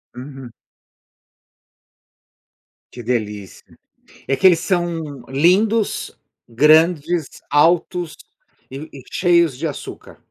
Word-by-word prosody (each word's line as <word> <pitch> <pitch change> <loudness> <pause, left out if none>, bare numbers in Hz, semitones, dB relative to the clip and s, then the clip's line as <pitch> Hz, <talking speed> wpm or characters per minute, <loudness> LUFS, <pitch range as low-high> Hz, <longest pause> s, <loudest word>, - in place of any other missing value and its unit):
Uhum. 130 -1 -10 2.4
Que 120 - -10
delícia. 105 -5 -5 0.5
É 135 - +1
que 190 - +3
eles 170 -3 +5
são 165 -8 -3
lindos, 195 +10 +1 0.3
grandes, 155 +5 +3 0.2
altos 170 +3 +1 0.5
e 140 +4 -8
e 135 - -11
cheios 170 -6 +2
de 165 - -3
açúcar. 145 - -8
155 Hz, 85 wpm, -19 LUFS, 135-175 Hz, 2.4 s, eles